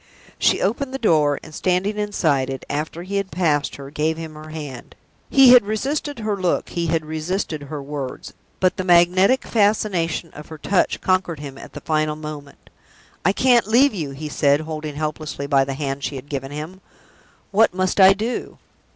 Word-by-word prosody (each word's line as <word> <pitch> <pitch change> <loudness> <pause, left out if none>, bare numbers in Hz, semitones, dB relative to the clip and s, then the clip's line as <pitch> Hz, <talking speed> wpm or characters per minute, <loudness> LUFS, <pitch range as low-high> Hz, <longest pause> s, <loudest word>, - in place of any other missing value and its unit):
She - - +2
opened 260 +7 -1
the - - -1
door, 155 - +2
and, 155 - -12
standing 185 +5 0
inside 155 -10 0
it, 135 -1 -6
after 155 +4 -3
he 200 +2 -3
had 200 -1 -2
passed 155 -6 0
her, 140 0 -10
gave 155 +2 -1
him 160 -1 -7
her 155 0 -11
hand. 150 -5 -8 0.3
He 270 -2 +7
had 250 -3 +8
resisted 275 +8 -2
her 215 -2 -2
look, 185 -3 -1
he 170 -1 -2
had 160 -1 0
resisted 160 +1 -3
her 145 0 -6
words, 140 -2 -6 0.3
but 185 -1 +2
the 185 - -2
magnetic 185 +7 +4
fascination 200 -6 0
of 150 - -10
her 160 - -9
touch 190 +5 0
conquered 185 -4 0
him 140 -2 -8
at - - -12
the 150 - -8
final 155 -1 0
moment. 150 -2 -10 0.5
"I 190 - +4
can't 240 0 +3
leave 255 +5 +4
you!" 160 -8 -3
he 140 +3 -7
said, 145 0 +2
holding 155 -2 -6
helplessly 155 -1 -4
by 140 -1 +3
the 135 0 -4
hand 140 -1 -4
she 145 - -3
had 135 +2 -9
given 135 -2 -4
him. 155 +6 -7 0.7
"What 220 +3 +4
must 185 +1 0
I 190 0 +8
do?" 220 +5 -4
160 Hz, 185 wpm, -21 LUFS, 150-195 Hz, 0.7 s, had